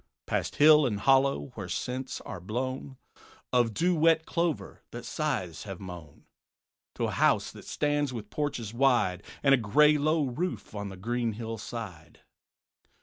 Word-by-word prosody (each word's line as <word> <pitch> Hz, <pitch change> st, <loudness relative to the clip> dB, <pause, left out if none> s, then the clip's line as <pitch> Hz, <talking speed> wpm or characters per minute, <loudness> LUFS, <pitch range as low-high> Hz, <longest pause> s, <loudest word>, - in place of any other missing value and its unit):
Past -, -, -2 dB
hill 150 Hz, -1 st, +7 dB
and 105 Hz, -4 st, -2 dB
hollow, 135 Hz, -, +3 dB
whence -, -, -5 dB
scents 130 Hz, +1 st, -4 dB
are 110 Hz, -, -7 dB
blown 130 Hz, +7 st, -4 dB, 0.6 s
Of 120 Hz, -2 st, +3 dB
dew 175 Hz, -, +1 dB
wet 160 Hz, 0 st, +3 dB
clover 170 Hz, -2 st, -2 dB
that -, -, -8 dB
scythes 90 Hz, 0 st, -3 dB
have 95 Hz, -3 st, -7 dB
mown; 85 Hz, -6 st, -10 dB, 0.7 s
To -, -, -3 dB
a -, -, 0 dB
house -, -, +2 dB
that -, -, -13 dB
stands 145 Hz, -2 st, 0 dB
with 115 Hz, -4 st, -7 dB
porches 125 Hz, -8 st, -3 dB
wide 115 Hz, -8 st, +2 dB, 0.2 s
And 135 Hz, -3 st, +5 dB
gray 150 Hz, +8 st, +5 dB
low 155 Hz, +2 st, +2 dB
roof 160 Hz, +5 st, -4 dB
on 100 Hz, -1 st, -4 dB
the 95 Hz, -, -9 dB
green 115 Hz, +3 st, -1 dB
hill 115 Hz, 0 st, -5 dB
side. 90 Hz, -9 st, -8 dB
125 Hz, 150 wpm, -29 LUFS, 105-145 Hz, 0.7 s, hill